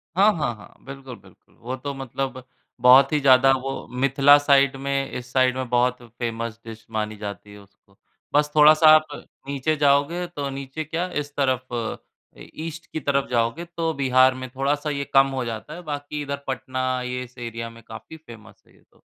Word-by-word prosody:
हाँ, 200 +4 +5
हाँ, 120 -6 -1
हाँ। 105 - -16
बिल्कुल, 135 -2 -9
बिल्कुल, - - -23
वो 125 +3 -5
तो 140 +2 -5
मतलब 135 0 -5 0.4
बहुत 130 +2 +7
ही 150 - +3
ज़्यादा 135 0 +6
वो 135 0 -5
मिथिला 140 +1 +6
साइड 140 -1 +3
में 135 0 -2
इस 125 0 -7
साइड 130 -1 +3
में 130 -2 -4
बहुत 125 +1 +1 0.2
फेमस 115 -1 -4
डिश 110 -1 -10
मानी 110 -1 -3
जाती 105 -1 -8
है 105 - -12
उसको, 100 0 -23 0.4
बस 150 0 +2
थोड़ा-सा 155 +1 +7
आप 155 0 +2 0.4
नीचे 140 +2 -1
जाओगे 145 +4 +2
तो 145 -5 -5
नीचे 135 +3 -6
क्या 165 +4 -3
इस 145 0 -10
तरफ 130 -2 0 0.9
ईस्ट 165 +1 -7
की 160 - -3
तरफ 140 -1 -1
जाओगे 120 +7 -1
तो 165 -1 0
बिहार 130 -2 +4
में 130 -1 -7
थोड़ा-सा 145 +3 -1
ये 140 -1 -3
कम 135 0 +6
हो 130 -2 -3
जाता 115 +6 -6
है 175 - -8
बाकी 145 -1 -5
इधर 140 0 -5
पटना 130 0 -2
ये 125 0 -4
इस 125 +1 -15
एरिया 115 -1 -6
में 115 0 -15
काफ़ी 110 +8 -11
फेमस 110 -9 -15
है - - -25
ये - - -26
तो। - - -28
135 Hz, 190 wpm, -23 LUFS, 125-145 Hz, 0.9 s, बहुत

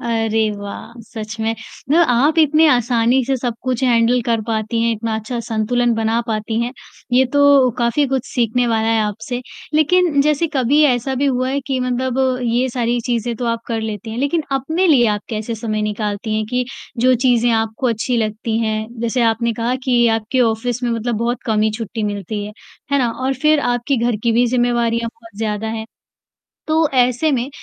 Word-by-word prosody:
अरे 225 -2 0
वाह! 205 +3 -8
सच 220 -1 -7
में। 220 0 0
मतलब 305 +8 0
आप 285 +7 +3
इतने 310 +1 +5
आसानी 245 -1 +2
से 270 +2 0
सब 245 -2 -3
कुछ 255 -1 -2
हैंडल 240 0 +3
कर 230 -2 +1
पाती 220 0 -1
हैं, 230 0 +2
इतना 225 0 -3
अच्छा 220 +3 -4
संतुलन 235 +2 0
बना 225 +1 0
पाती 220 0 -2
हैं। 240 +1 -2 0.4
ये 255 +2 +5
तो 285 -3 +5
काफ़ी 240 +5 +2
कुछ 265 -2 -1
सीखने 245 0 0
वाला 225 -1 +1
है 225 -1 +2
आपसे। 220 +4 -4 0.3
लेकिन 310 -1 +3
जैसे 300 +2 +2
कभी 265 +4 +3
ऐसा 255 0 0
भी 275 +2 0
हुआ 255 -1 0
है 280 +2 -1
कि 265 -2 -1
मतलब 255 +1 0
ये 240 +2 +1
सारी 240 -1 -1
चीज़ें 235 -1 -1
तो 245 - -4
आप 230 0 -1
कर 225 -2 -2
लेती 220 0 -5
हैं, 225 - -5
लेकिन 285 +4 0
अपने 315 +8 0
लिए 260 -8 +5
आप 210 -1 0
कैसे 220 +1 -3
समय 215 -1 -3
निकालती 210 +1 -2
हैं 215 - -1
कि 250 0 0 0.3
जो 255 +2 +4
चीज़ें 245 -1 +2
आपको 225 +2 0
अच्छी 235 +2 -1
लगती 220 0 -1
हैं। 220 -1 -1
जैसे 235 +1 0
आपने 230 +1 +1
कहा 235 +2 -1
कि 240 -2 +3
आपके 225 +4 -2
ऑफ़िस 235 +1 0
में 240 - 0
मतलब 230 +1 -1
बहुत 235 +3 -2
कम 220 -2 +1
ही 215 - +2
छुट्टी 225 0 -5
मिलती 205 0 -3
है। 210 - -8 0.4
है 280 - +4
ना? 245 -3 +1
और 260 +3 -2
फ़िर 305 +3 +3
आपकी 245 +2 0
घर 235 -1 0
की 235 - +2
भी 240 +2 +3
ज़िम्मेवारियाँ 235 -1 +1
बहुत 225 -2 -17
ज़्यादा 215 -1 -2
हैं। 220 0 -4 0.8
तो 315 - +1 0.2
ऐसे 250 +4 +3
में 250 -1 -1
235 Hz, 195 wpm, -18 LUFS, 225-255 Hz, 0.8 s, इतने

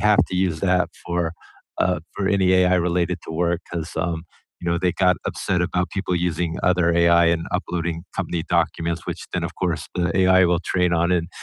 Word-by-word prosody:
have 105 0 +4
to 90 - -3
use 90 -4 0
that 90 -1 +2 0.2
for, 85 -1 -1 0.5
uh 90 0 +1
for 100 - -1
any 100 -2 +2
AI 90 0 +4
related 90 0 0
to - - -6
work 85 +1 0
'cause, 85 -2 -4
um, 85 -2 -2 0.4
you 85 - -2
know, 85 - +1
they 90 -1 +1
got 90 -2 +3
upset 90 -2 -1
about 90 0 -1
people 95 -2 -2
using 85 -1 -1
other 90 -2 +3
AI 85 0 +5
and 85 0 +1
uploading 85 -1 -2
company 85 -2 -2
documents, 85 -1 0
which - - -5
then 90 -2 -1
of 85 0 -5
course 80 -5 -2
the 90 -1 0
AI 95 -1 +5
will 85 0 +1
train 90 -1 +1
on, 85 +2 +2
and 85 -1 0
90 Hz, 200 wpm, -22 LUFS, 85-90 Hz, 0.5 s, AI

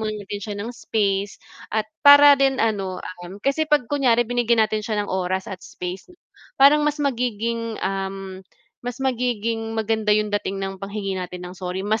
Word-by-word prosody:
muna 215 -1 -2
natin 205 0 -6
siya 205 +1 -5
ng 215 +4 -5
space 200 -4 -1 0.3
at 220 0 -1 0.2
para 285 0 +9
din 270 -1 +3
ano, 195 -6 -1 0.2
um, 175 +2 -9
kasi 275 +8 -1
'pag 295 -4 +3
kunyari 240 -3 +2
binigyan 235 -1 +2
natin 215 0 -2
siya 210 -1 -2
ng - - -6
oras 185 0 -1
at 190 -2 -8
space, 180 +1 -7 0.5
parang 280 +2 +6
mas 295 - -2
magiging, 230 -3 -2
um, 195 0 -4 0.4
mas 245 0 -5
magiging 230 -3 -1
maganda 220 -1 -1
yung 210 -1 -1
dating 205 -1 -1
ng 195 -1 -5
panghingi 195 -1 -4
natin 180 0 -7
ng 180 - -8
sorry, 185 0 -5
mas 215 +2 0
215 Hz, 175 wpm, -22 LUFS, 195-240 Hz, 0.5 s, para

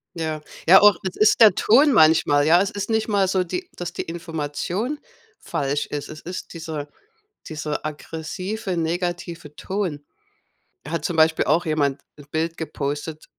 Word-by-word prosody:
Ja, 155 -2 -3 0.3
ja, 190 +3 +9
auch 205 -3 +7
es 185 - -4
ist 215 +2 +3
der 220 -2 +9
Ton 275 +5 +5
manchmal, 155 -4 +5
ja? 170 +3 +5
Es 200 +2 -1
ist 205 +2 -4
nicht 220 -1 0
mal 200 -3 +2
so, 185 0 +1
die 360 - -5
dass 175 -1 -6
die - - -3
Information 170 - -4 0.4
falsch 145 +1 -2
ist. 145 -1 -5
Es 155 0 -9
ist 180 +1 -7
dieser 160 -3 -6 0.6
dieser 150 -1 -4
aggressive, 175 +6 -5
negative 170 -2 -3
Ton. 185 -7 -3 0.8
Er 150 - -9
hat 160 -2 -2
zum 170 -3 -2
Beispiel 160 0 +4
auch 175 +1 +2
jemand 145 -3 0 0.2
'n 145 - -13
Bild 165 +1 -2
gepostet 150 0 -4
165 Hz, 160 wpm, -22 LUFS, 155-190 Hz, 0.8 s, ja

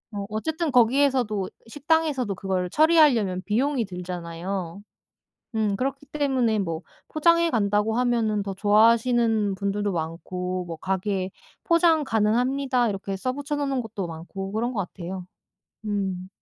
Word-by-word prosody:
어 200 -1 -3
어쨌든 315 +9 -2
거기에서도, 245 -5 +3 0.2
식당에서도 295 -4 0
그걸 185 -1 -2
처리하려면 285 - +4
비용이 255 +4 +1
들잖아요. 180 0 -5 0.8
음 215 -2 +1
그렇기 270 +5 -3
때문에 260 -7 +1
뭐 165 -4 -2 0.3
포장해 335 +2 +3
간다고 210 -1 +1
하면은 230 -4 +1
더 200 0 -4
좋아하시는 220 +1 +3
분들도 200 +1 -1
많고 180 +2 -3
뭐 165 -1 -6
가게 190 +2 -2 0.3
"포장 335 -2 +4
가능합니다." 245 +3 +1
이렇게 195 -1 -4
써 255 +7 -2
붙여 285 +2 -4
놓는 275 -2 -1
곳도 215 -5 -5
많고 175 +4 -7
그런 235 +4 -1
것 210 - 0
같아요. 185 +1 -6 0.6
음. 190 -3 -2
215 Hz, 310 characters per minute, -25 LUFS, 190-260 Hz, 0.8 s, 처리하려면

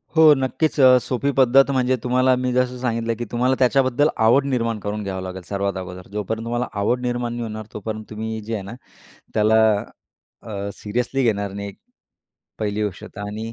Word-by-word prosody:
हो 160 -2 +8
नक्कीच, 140 +4 -1
अ, 130 -1 +8
सोपी 135 +3 -1
पद्धत 135 +2 +5
म्हणजे 130 -1 +2
तुम्हाला 130 +1 +3
मी 125 0 -1
जसं 125 0 +1
सांगितलं 115 -2 -1
की 120 - -4
तुम्हाला 125 +2 +2
त्याच्याबद्दल 130 +2 +3 0.2
आवड 135 +4 +4
निर्माण 115 -5 -1
करून 105 +1 -4
घ्यावं 95 -1 -4
लागेल 95 0 -6
सर्वात 100 -1 -1
अगोदर. 90 0 -8
जोपर्यंत 105 +2 -3
तुम्हाला 120 +1 -1
आवड 120 +5 +1
निर्माण 120 -1 -2
नाही 120 - -4
होणार, 110 -1 -6
तोपर्यंत 110 +1 -5
तुम्ही 110 +1 -4
जे 110 +2 -6
आहे 105 -3 -3
ना, 100 - -8 0.6
त्याला 110 +1 +4 0.8
अ, - - -12 0.3
सिरियसली 125 +5 -2
घेणार 100 -4 0
नाही 100 0 -6 0.9
पहिली 105 0 -1
गोष्ट 100 -3 -5
तर 100 - -10
आणि 105 +2 -5
115 Hz, 180 wpm, -22 LUFS, 105-125 Hz, 0.9 s, हो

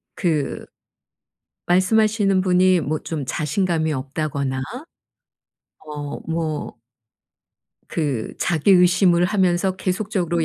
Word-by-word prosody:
그 155 -6 -1 1.0
말씀하시는 195 +1 +3
분이 185 -1 +3
뭐 150 +2 -2
좀 150 -4 -5
자신감이 160 +2 -1
없다거나 140 0 -3 1.3
어 145 -1 -6
뭐 160 -2 -3 1.2
그 140 -9 -2
자기 170 +2 +1
의심을 180 -1 +4
하면서 185 -1 +1
계속적으로 185 -3 -1
175 Hz, 195 characters per minute, -21 LUFS, 150-185 Hz, 1.3 s, 의심을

